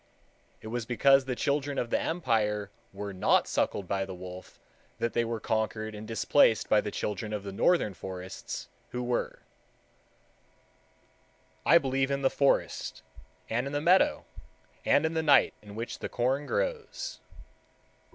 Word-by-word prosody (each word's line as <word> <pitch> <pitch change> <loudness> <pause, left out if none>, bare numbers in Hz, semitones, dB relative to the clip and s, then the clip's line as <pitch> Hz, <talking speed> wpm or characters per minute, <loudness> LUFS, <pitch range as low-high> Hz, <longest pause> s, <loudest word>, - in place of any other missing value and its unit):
It 110 - -8
was 115 -1 -3
because 135 +3 +4
the 130 -1 -2
children 140 +1 -1
of 120 - -2
the - - +2
Empire 105 - 0 0.2
were 100 +1 -6
not 95 - +3
suckled 100 - -1
by 100 0 0
the 95 -1 -6
wolf 90 0 -10 0.4
that 115 - -1
they 120 - +2
were 115 -1 -3
conquered 110 0 -2
and 105 +1 -8
displaced 115 0 +3
by 105 - +4
the - - -4
children 105 +1 -3
of 105 -2 -3
the 100 - -6
northern 105 - +2
forests 95 +1 -7 0.2
who 125 0 -4
were. 120 0 -2 2.2
I 170 - +8
believe 135 -2 0
in 140 0 -1
the 135 - +3
forest, 140 -1 0 0.4
and 120 +4 -1
in 140 - -6
the 145 - +1
meadow, 175 +5 +3 0.6
and 145 - +4
in 160 - 0
the 160 - +1
night 145 -3 +5
in 105 -1 -12
which 115 +2 -5
the - - -4
corn 130 +4 0
grows. - - -3
115 Hz, 155 wpm, -29 LUFS, 105-140 Hz, 2.2 s, I